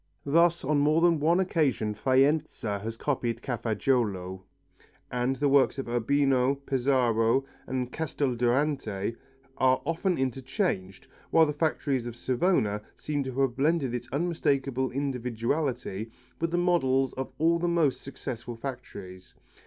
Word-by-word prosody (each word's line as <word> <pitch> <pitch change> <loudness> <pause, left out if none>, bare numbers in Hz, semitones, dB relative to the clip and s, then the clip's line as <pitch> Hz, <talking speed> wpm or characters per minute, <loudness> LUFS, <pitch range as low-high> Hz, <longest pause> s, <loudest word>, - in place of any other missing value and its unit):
Thus 170 +2 +3
on 150 +1 +2
more 150 +3 +3
than 170 -2 +4
one 165 +5 +3
occasion 145 - +1
Faenza 130 -3 +1
has 115 +2 -5
copied 120 -4 -2
Cafaggiolo, 110 -6 -1 0.7
and 125 +2 0
the 145 +2 +1
models 140 0 +4
of 135 - -4
Urbino, 130 +2 +2
Pesaro 130 -3 +1 0.2
and 125 -1 -2
Casteldurante 125 -6 -1 0.4
are 130 0 +4
often 170 +3 0
interchanged, 130 - -2 0.2
while 165 -1 +5
the 150 - -2
factory 150 -2 0
of 120 -1 -6
Savona 120 - +1 0.2
seems 145 -3 -2
to 130 +1 -2
have 130 -3 +1
blended 140 -2 +1
its 120 0 -4
unmistakable 140 -4 0
individuality 125 -3 -2 0.3
with 165 - 0
the 175 - -1
models 135 -7 +2
of 130 0 -5
all 165 +2 +3
the 175 - 0
most 165 -6 +1
successful 120 -3 -6
factories. 115 -8 -8
135 Hz, 130 wpm, -28 LUFS, 120-150 Hz, 0.7 s, while